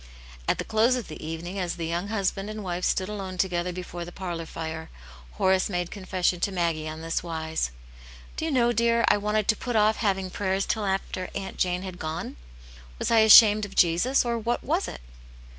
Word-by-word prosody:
At - - +2
the - - -3
close 225 +3 +3
of 245 -4 -5
the 155 - -8
evening, 165 +4 -5
as 180 -2 -2
the 170 - -4
young 170 +4 -2
husband 200 -1 -1
and 215 0 -6
wife 180 -1 -3
stood 185 - +1
alone 195 -3 -5
together 180 -1 0
before 175 -1 -6
the 175 - -9
parlour 175 -3 -5
fire, 160 0 -6 0.4
Horace 190 +1 +2
made 175 -2 -2
confession 185 -2 -1
to 200 - 0
Maggie 165 -4 -1
on 155 +1 -7
thiswise: 160 - -2 0.3
" - - -18
Do 315 - -3
you - - -1
know, 245 -4 +3
dear, 235 +1 +3
I - - +5
wanted 210 0 0
to 220 - +5
put 245 +2 -4
off 215 0 +4
having 195 -3 0
prayers 195 0 -1
till 215 -3 -1
after 190 -1 -2
Aunt 195 -1 -5
Jane 180 0 0
had 185 -2 -7
gone? 160 +2 -4 0.6
Was - - -2
I 230 - +6
ashamed 215 -1 +8
of 205 -1 -6
Jesus, 180 +12 +3
or 235 -1 -1
what 235 +2 -1
was - - 0
it 60 - -8
190 Hz, 205 wpm, -26 LUFS, 170-210 Hz, 0.6 s, ashamed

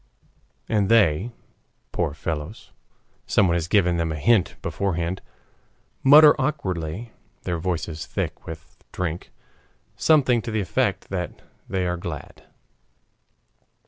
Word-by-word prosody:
'" - - -40
And 100 -2 +2
they, 100 -3 +4 0.6
poor 70 - -1
fellows 80 +5 -5 0.6
(someone 95 -4 +3
has 85 -1 -1
given 90 -3 +3
them 85 -1 -1
a - - -2
hint 100 +5 +2
beforehand), 90 -1 -2 0.8
mutter 150 +2 +9
awkwardly, 95 - -3 0.3
their 85 -2 -2
voices 85 -2 -3
thick - - -4
with 80 0 -10
drink, 85 -2 -4 0.7
something 130 -7 +3
to 115 - -6
the 110 -1 -1
effect 100 - -1
that - - -4 0.3
they 95 -1 0
are 90 0 -1
glad. 85 -4 -8
90 Hz, 115 wpm, -24 LUFS, 80-110 Hz, 0.8 s, mutter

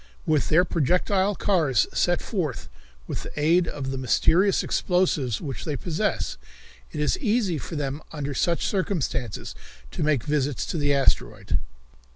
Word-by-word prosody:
"With 150 -6 +1
their 175 +4 +5
projectile 185 +6 +1
cars 155 - +2
sent 175 0 +1
forth 165 - -3 0.4
with - - -4
the - - -7
aid 170 +3 +3
of 135 -2 -4
the 135 - -3
mysterious 175 - +3
explosives 160 - +1
which 140 -5 -5
they 150 - -2
possess, 175 +7 -2 0.5
it 155 - -5
is 150 - +1
easy 210 - +1
for 165 - -6
them 145 0 -3
under 145 -2 -4
such 170 +5 +1
circumstances, 140 - -2 0.4
to - - -5
make 150 -6 +2
visits 145 -2 0
to 165 - -3
the 145 -1 +2
asteroid." 140 -1 +1
155 Hz, 150 wpm, -25 LUFS, 140-180 Hz, 0.5 s, their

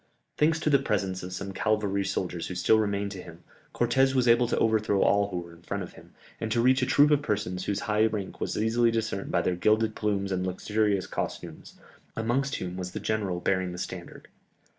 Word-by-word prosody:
Thanks 160 +2 +2
to 155 - +1
the 140 - +5
presence 95 -7 -1
of 90 - -7
some 100 +2 -5
cavalry 105 -2 0
soldiers 90 -3 -3
who 90 - -6
still 90 +5 +4
remained 100 -1 -1
to 95 -3 -7
him, 85 0 -13 0.3
Cortès 130 +3 +2
was 125 -2 +2
able 120 +1 +5
to - - -1
overthrow 110 -3 +2
all 100 0 +3
who 90 - -4
were 85 0 -12
in 85 - -17
front - - -4
of - - -10
him, - - -16 0.3
and 110 -1 -3
to 120 - +1
reach 130 +3 +4
a 125 - +1
troop 145 +2 +5
of 145 -1 +4
persons 100 -7 -2
whose 100 -1 -1
high 105 +1 +2
rank 105 -3 -5
was - - -2
easily 115 +2 +2
discerned 110 -3 -2
by 85 - +1
their 90 - +1
gilded 110 +4 +2
plumes 100 -2 -1
and 95 0 -1
luxurious 100 +1 0
costumes, - - -6 0.4
amongst 125 +5 0
whom 90 0 -5
was 90 -1 -5
the - - -4
general 100 -5 -1
bearing 95 -1 0
the - - -7
standard. 90 -1 -7
105 Hz, 215 wpm, -27 LUFS, 95-115 Hz, 0.4 s, the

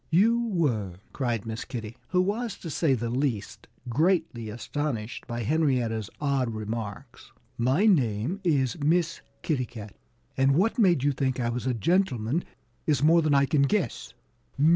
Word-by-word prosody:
"You 230 +8 +3
were!" 120 - 0 0.2
cried 120 -6 -1
Miss 110 +1 -4
Kitty, 115 -3 -6
who 180 -1 +2
was 215 +3 -2
to 165 - -7
say 145 -4 +2
the 120 -1 -3
least 125 -5 -2 0.2
greatly 150 - +1
astonished 120 0 -4
by 120 -1 -3
Henrietta's 120 -6 +1
odd 140 -4 0
remarks. 110 -1 -6 0.2
"My 130 - +2
name 135 - +2
is 145 -4 +1
Miss 165 +3 +1 0.2
Kitty 130 -6 0
Cat. 105 -3 -10 0.4
And 135 +1 +3
what 220 - +2
made 175 - +4
you 145 - +3
think 130 -1 -1
I 120 -1 0
was 125 +2 -3
a 125 - +1
gentleman 140 - +1 0.4
is 145 -3 +2
more 165 +2 +6
than 150 -2 +2
I 140 0 +5
can 140 +1 +2
guess." 145 - -1
135 Hz, 155 wpm, -27 LUFS, 115-165 Hz, 0.4 s, more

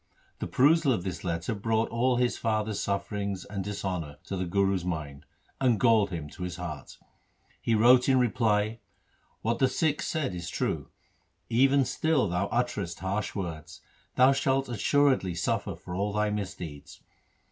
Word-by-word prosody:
The - - -3
perusal 150 +2 +4
of 90 - -2
this 95 -2 -5
letter 85 +3 -2
brought 110 +2 0
all 125 +2 +1
his 125 0 +1
father's 110 -2 -1
sufferings 100 -1 -2
and 100 -1 -4
dishonour 90 -7 -4
to 95 - -5
the 90 -1 -2
Guru's 95 0 +1
mind, 75 -6 -5 0.3
and 125 -5 +2
galled 110 -4 +4
him 80 -5 -5
to 90 +3 -5
the 85 0 -8
heart. 80 -6 -7 0.6
He 115 - +1
wrote 125 +4 +6
in 130 - +5
reply, 110 -2 +1 0.3
' - - -39
What 115 +1 0
the 130 - +5
Sikhs 150 +2 0
said 155 - -1
is 85 -1 -5
true. - - -2 0.6
Even 135 +3 +4
still 155 -6 +1
thou 90 +3 -1
utterest 105 -8 -2
harsh 100 +2 -2
words. 85 -6 -6 0.3
Thou 130 +1 +6
shalt 135 -1 +1
assuredly 125 - +2
suffer 90 - -1
for 90 - -9
all 100 +3 -1
thy 105 0 +1
misdeeds. 90 -8 -6
105 Hz, 160 wpm, -28 LUFS, 90-125 Hz, 0.6 s, wrote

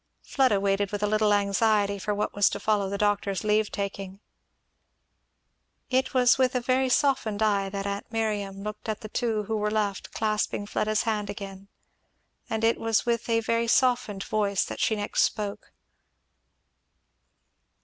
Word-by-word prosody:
Fleda 260 -8 +2
waited 195 0 0
with 205 0 -3
a - - +2
little 215 0 +2
anxiety 200 0 +2
for 210 - -2
what 210 - -2
was 205 -1 +4
to - - -5
follow 205 -3 +1
the 200 - -3
doctor's 205 -1 0
leave 215 0 +1
taking. 195 -1 -5 1.7
It 260 +1 +1
was 250 0 +4
with 260 0 +2
a - - +3
very 255 +2 +1
softened 245 -6 +1
eye 200 -2 +1
that 195 0 -4
aunt 200 +2 -4
Miriam 205 -3 -2
looked 210 +1 -6
at 215 +1 -3
the 215 - -8
two 225 -2 -1
who 220 +2 -3
were 210 0 0
left, 210 -2 -2
clasping 215 -1 -1
Fleda's 215 +1 0
hand 210 -2 -2
again; 195 -1 -8 0.8
and 220 0 -2
it 225 +1 +3
was 225 -1 +1
with 235 0 -1
a 230 0 +2
very 230 +1 0
softened 235 -5 +2
voice 200 -2 0
that - - -7
she 220 - +2
next 205 -1 -1
spoke. 205 -2 -2
210 Hz, 160 wpm, -26 LUFS, 200-225 Hz, 1.7 s, was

